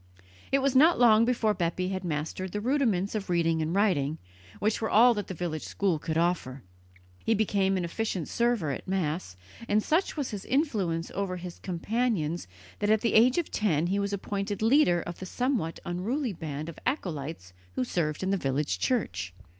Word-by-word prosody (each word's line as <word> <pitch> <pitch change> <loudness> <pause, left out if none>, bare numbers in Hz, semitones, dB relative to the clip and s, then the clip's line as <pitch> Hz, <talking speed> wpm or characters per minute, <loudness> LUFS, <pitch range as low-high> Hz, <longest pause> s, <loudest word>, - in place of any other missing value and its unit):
It 275 0 +3
was 275 -1 +2
not 315 +6 +6
long 230 -2 +6
before 230 -3 +2
Bepi 180 0 -1
had 190 -1 -3
mastered 170 +3 -3
the 210 - -1
rudiments 220 -6 +1
of 210 -3 -3
reading 165 -2 +2
and 160 +3 -1
writing, 165 -8 +2 0.4
which 215 +2 0
were 220 - 0
all 240 +3 +6
that 205 -3 -4
the 185 - -5
village 155 -2 -3
school 185 -6 -1
could 160 0 -2
offer. 165 -7 0 0.6
He 225 - +2
became 195 -2 +1
an 180 - -1
efficient 185 -1 -2
server 235 -10 +1
at 135 - -6
Mass, 165 - -2 0.3
and 210 +1 +2
such 330 +2 +1
was 280 -5 -2
his 205 -3 -5
influence 205 - 0
over 190 -2 -2
his 175 -1 -8
companions 180 - -1 0.3
that 205 - 0
at 215 0 +4
the 230 - +1
age 245 +5 +5
of 345 - -1
ten 170 -7 +1
he 195 +3 0
was 200 0 -1
appointed 200 +1 -3
leader 225 - +4
of 175 - -7
the 185 - -6
somewhat 245 - -1
unruly 220 +8 -2
band 155 -2 -5
of 170 - -8
acolytes 155 - -3 0.2
who 130 - +1
served 155 +4 -1
in 190 - 0
the 195 - +2
village 140 -1 -1
church. 95 - -1
190 Hz, 185 wpm, -28 LUFS, 165-225 Hz, 0.6 s, not